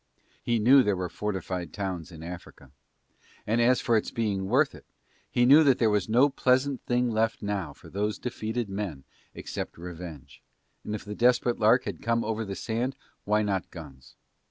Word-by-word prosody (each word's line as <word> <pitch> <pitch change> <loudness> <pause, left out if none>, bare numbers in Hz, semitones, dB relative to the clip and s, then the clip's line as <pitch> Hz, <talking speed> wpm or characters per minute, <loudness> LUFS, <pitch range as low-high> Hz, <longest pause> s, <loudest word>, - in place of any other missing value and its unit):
He 120 -1 0
knew 130 +5 +6
there 105 -5 +1
were 90 -1 -3
fortified 95 -3 -4
towns 95 -4 -4
in 80 -1 -10
Africa, 85 -6 -10 0.7
and 115 +3 +1
as 125 +1 +4
for 120 - +2
its 110 - +1
being 100 -4 -2
worth 135 +6 +3
it, - - -14 0.4
he 120 - +2
knew 145 +5 +8
that 135 -4 +4
there 110 -2 +3
was 105 0 0
no 125 +6 +5
pleasant 130 0 +1
thing 120 0 +1
left 110 0 0
now 100 -7 -3
to - - -16
those 105 +1 -1
defeated 115 -1 -3
men 95 -8 -5 0.3
except - - -6
revenge, 85 -4 -9 0.4
and 105 - -4
if 105 - -7
the 105 - -5
Desperate 120 +1 +2
Lark 115 +4 +4
had - - -6
come 115 0 +1
over 110 0 -2
the 100 -2 -5
sand 120 +6 -2 0.3
why 105 +1 +2
not 95 -3 -2
guns? 70 -6 -12
105 Hz, 180 wpm, -27 LUFS, 95-120 Hz, 0.7 s, knew